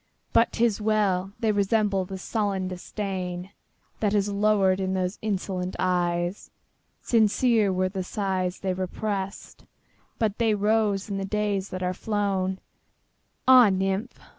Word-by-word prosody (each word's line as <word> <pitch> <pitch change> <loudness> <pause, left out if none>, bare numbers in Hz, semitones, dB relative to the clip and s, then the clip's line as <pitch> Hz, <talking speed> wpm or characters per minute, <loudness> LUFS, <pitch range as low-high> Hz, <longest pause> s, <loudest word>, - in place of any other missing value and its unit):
But 230 - +4
't 235 - +2
is 220 -2 0
well!—they 210 0 +1
resemble 200 -1 +1
the 190 +1 -6
sullen 195 -1 -1
disdainThat 185 +2 -5
has 205 -1 +2
lowered 200 -2 +3
in 190 0 -1
those 185 +1 -2
insolent 190 -3 -2
eyes. 175 0 -1 0.5
Sincere 225 -1 +3
were 185 0 +1
the 190 0 -4
sighs 185 -2 -2
they 190 -1 0
represt, 195 +1 -4 0.5
But 215 -2 -1
they 225 -2 +3
rose 210 -1 +1
in 200 -2 -3
the 195 - -2
days 200 -1 -1
that 185 0 -5
are 180 0 0
flown! 195 -2 -1 0.9
Ah, 255 -4 +8
nymph! 195 +5 -1
195 Hz, 130 wpm, -26 LUFS, 185-210 Hz, 0.9 s, Ah